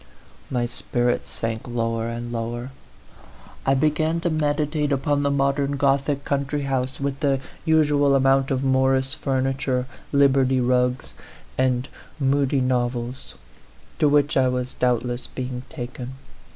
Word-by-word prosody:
My 125 -2 0
spirits 120 0 -1
sank 115 0 -4
lower 115 -1 -1
and 120 +1 -5
lower. 120 +2 -4 1.0
I 135 - +4
be 150 +3 +3
gan 160 +2 0
to 175 - 0
meditate 150 -1 0
upon 145 +1 +1
the 140 - +1
modern 140 0 +1
Gothic 140 +1 +1
country 140 +1 -1
house, 130 -1 -1
with 140 0 -2
the 140 -2 +1 0.3
usual 145 -3 +4
amount 135 0 +3
of 135 0 0
Morris 130 0 +2
furniture, 135 -3 -1 0.3
Liberty 135 -2 +4
rugs, 125 +1 +1 0.4
and 130 0 +1 0.3
Mudie 140 0 +2
novels, 125 0 -2 0.6
to 150 -3 +4
which 145 +1 +3
I 130 -1 +4
was 125 0 -2
doubtless 125 0 0
being 125 -1 -5
taken. 125 -2 -6
135 Hz, 130 wpm, -23 LUFS, 125-140 Hz, 1.0 s, I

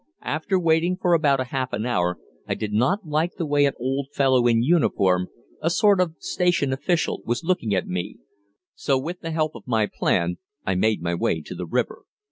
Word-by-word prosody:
After 160 +5 0
waiting 165 +1 +2
for 180 -2 +2
about 140 -5 +3
half 130 0 -3
an 105 +2 -2
hour 90 -7 0 0.3
I - - -1
did 105 -1 -4
not 175 - +1
like 155 +4 0
the 170 - -3
way 145 -1 +3
an 140 - -1
old 135 +2 -2
fellow 130 -4 +3
in 115 -1 +3
uniform, 95 - +2 0.3
a 165 - +1
sort 200 +2 +4
of 165 -3 -1
station 175 -7 0
official, 165 +5 0
was 120 +7 -2
looking 165 - 0
at 95 - 0
me, 90 -1 -4 0.6
so 135 -2 0
with 170 +7 -4
the 165 - -6
help 155 -1 0
of - - -12
my 110 -3 +2
plan 85 -3 0 0.3
I 95 - +1
made 105 0 +1
my 85 0 -1
way 85 -1 0
to - - -8
the - - -6
river. - - -2
135 Hz, 200 wpm, -24 LUFS, 110-165 Hz, 0.6 s, sort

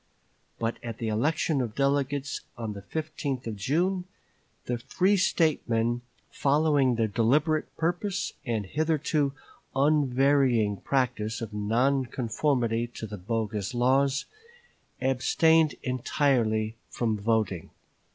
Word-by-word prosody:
But 115 0 -2
at 115 -2 -6
the 115 - -2
election 145 +5 +1
of 115 -4 -4
delegates 140 0 0 0.2
on 115 -3 -4
the 100 - -8
15th 145 +1 -4
of 115 -2 -4
June, 175 - 0 0.6
the 120 -1 -2
free 185 - +2
State 165 -7 +1
men, 120 +1 +1 0.3
following 145 -3 +2
their 115 -1 +2
deliberate 145 +9 +2
purpose 180 +4 -1
and 115 -6 -2
hitherto 150 - 0 0.4
unvarying 135 -6 +3
practice 120 -2 -1
of 110 -3 -6
non 120 +6 +1
conformity 120 -1 0
to - - -5
the 105 -1 -7
bogus 105 +1 -2
laws, 135 +3 +2 0.7
abstained 155 +5 +3
entirely 120 -4 +1
from 110 -3 -1
voting. 105 -5 0
130 Hz, 110 wpm, -27 LUFS, 115-145 Hz, 0.7 s, unvarying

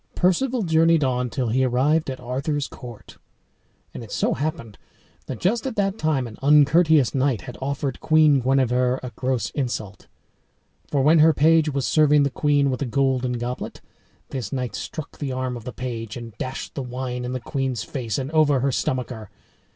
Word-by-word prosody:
Perceval 235 +7 +1
journeyed 165 -2 +3
on 125 -1 0
till 125 -1 -2
he 130 +4 +2
arrived 135 +5 +2
at 130 - -5
Arthur's 135 +4 -2
court. 120 -4 -12 0.7
And - - -7
it 110 - -12
so - - 0
happened 135 - -4 0.5
that 130 - -5
just 225 +8 0
at 255 - -4
that 200 0 0
time 150 -5 0
an 115 -2 -10
uncourteous 150 0 +4
knight 130 -6 +1
had - - -9
offered 140 -1 -3
Queen 155 -3 +4
Guenever 125 0 +1
a 125 - -5
gross 125 -5 -2
insult. 120 -7 -4 0.8
For 140 -2 0
when 155 +3 +5
her 160 +1 +6
page 160 0 +4
was 135 -2 -1
serving 150 -2 +4
the 140 - 0
queen 145 -1 +2
with 130 - -3
a 140 - -1
golden 130 0 +1
goblet, 120 +1 -5 0.5
this 125 -6 -5
knight 125 -2 -3
struck 155 -3 -7
the 140 -3 -3
arm 130 -1 -3
of 120 -1 -9
the 125 - -5
page 115 -4 -5
and 115 -3 -9
dashed 130 +1 -5
the 140 - -4
wine 125 0 -4
in 125 +1 -4
the 130 - -2
queen's 130 -2 -3
face 115 -7 -4
and 135 +2 -4
over 150 -4 +3
her 140 +1 +1
stomacher. 125 -5 -3
130 Hz, 180 wpm, -23 LUFS, 125-150 Hz, 0.8 s, her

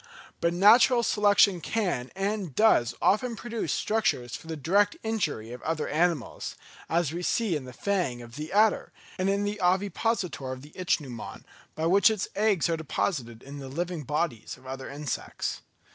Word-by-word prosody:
But 170 0 +1
natural 235 +6 +6
selection 205 -4 +4
can 180 - -1
and 195 -5 -2
does 125 - +4
often 230 +4 +2
produce 230 0 -4
structures 195 - 0
for - - -10
the 160 -1 -4
direct 200 +8 +2
injury 165 - -2
of 125 - -8
other 160 -1 -2
animals, 160 -4 -1 0.3
as 165 -2 +1
we 175 - -3
see 205 0 +1
in 145 -4 -4
the 125 - -9
fang 175 -5 -1
of 120 0 -12
the 155 +2 -6
adder, 210 +2 +3 0.3
and 185 +1 +1
in 200 +1 +1
the 205 0 -3
ovipositor 185 - 0
of 130 0 -7
the 150 - -14
ichneumon, 145 -10 -3 0.3
by 160 - -2
which 195 +6 +5
its 215 -3 -2
eggs 205 -5 +2
are 165 -1 0
deposited 130 - -3
in 140 +1 -9
the 135 -1 -7
living 170 +3 -3
bodies 145 -5 -2
of 130 - -20
other 130 0 -6
insects. 145 -2 -4
175 Hz, 170 wpm, -27 LUFS, 140-205 Hz, 0.3 s, natural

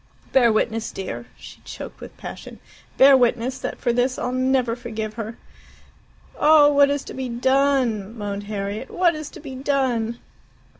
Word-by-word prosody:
Bear 245 -3 +5
witness, 220 +1 -1
dear" 195 +5 -6
she - - -13
choked - - -9
with - - -11
passion - - -9 0.4
"bear 275 +1 +8
witness 250 +1 +1
that - - -4
for 240 -3 0
this 250 +2 +1
I'll 250 - -2
never 255 -2 +1
forgive 220 -3 -5
her!" 225 0 -6 1.0
"Oh, 295 -1 +6
what 285 0 +5
is 285 -1 -1
to - - -9
be 260 -1 -4
done?" 245 -4 +1
moaned 205 -1 -4
Harriet. 205 +3 -4
"What 350 -2 +2
is 310 -2 -6
to - - -12
be 265 - -8
done?" 255 -4 -1
245 Hz, 160 wpm, -22 LUFS, 225-270 Hz, 1.0 s, bear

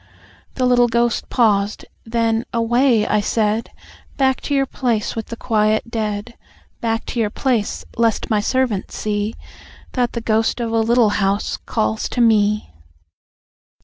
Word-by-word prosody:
The 255 - 0
little 245 -1 +4
ghost 235 0 0
paused. 210 -4 +1 0.2
Then 230 0 +1
"Away!" 235 0 +2
I 210 - +2
said. 215 +1 0 0.5
"Back 265 -2 +2
to 285 - -2
your 275 0 +2
place 240 -5 -1
with 225 -1 -4
the 230 - -6
quiet 220 0 0
dead. 215 0 -3 0.5
Back 225 -1 -1
to 240 - -2
your 215 -2 +1
place, 235 -2 -1
lest 230 -2 +1
my 215 -2 +1
servants 235 -2 -1
see, 210 +1 -2 0.6
That 245 -2 0
the 235 - -2
ghost 225 +1 +1
of 230 -1 -2
a 225 - +2
Little 230 0 +3
House 195 +1 0
calls 110 0 -1
to - - -4
me." 210 - +2
225 Hz, 145 wpm, -20 LUFS, 210-240 Hz, 0.6 s, little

